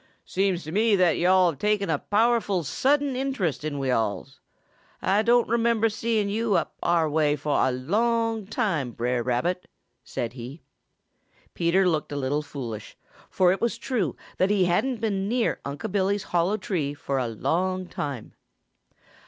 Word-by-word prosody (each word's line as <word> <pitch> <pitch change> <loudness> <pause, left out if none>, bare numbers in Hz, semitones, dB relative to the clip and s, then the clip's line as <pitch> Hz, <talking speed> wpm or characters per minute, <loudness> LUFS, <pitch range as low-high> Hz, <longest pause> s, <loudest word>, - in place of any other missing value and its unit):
"Seems 190 -2 0
to 155 - -7
me 215 +3 +3
that 180 -4 +3
yo'all 180 0 +4
have 140 - -13
taken 210 +2 +1
a 155 -3 0
powerful 215 -4 +1
sudden 275 - +1
interest 255 - -1
in 155 -2 -3
we 135 -2 -1
alls. 115 +3 -2 0.6
Ah 195 +3 +2
don' 240 +2 +3
remember 230 -1 +2
seeing 220 -1 0
yo' 220 +1 0
up - - 0
our 170 -2 +2
way 150 -1 +2
fo' 150 0 -4
a 130 - +3
long 225 - 0
time, 165 - -1
Brer 120 +1 -1
Rabbit," 130 +10 -1 0.4
said 115 -1 -4
he. 130 +5 -9 0.9
Peter 180 +2 +2
looked 155 -5 0
a - - -3
little 140 +2 0
foolish, 120 -8 -7 0.3
for 180 -1 +3
it 190 - -1
was 235 -1 0
true 225 - -1 0.2
that 185 - +2
he 200 -3 +3
hadn't 225 +7 0
been 200 -3 -1
near 240 0 0
Unc' 145 +9 -5
Billy's 200 0 +1
hollow 180 +3 +1
tree 160 -8 -2
for 140 -2 -2
a 125 - -1
long 185 - -1
time. 140 -8 -5
185 Hz, 160 wpm, -25 LUFS, 145-215 Hz, 0.9 s, yo'all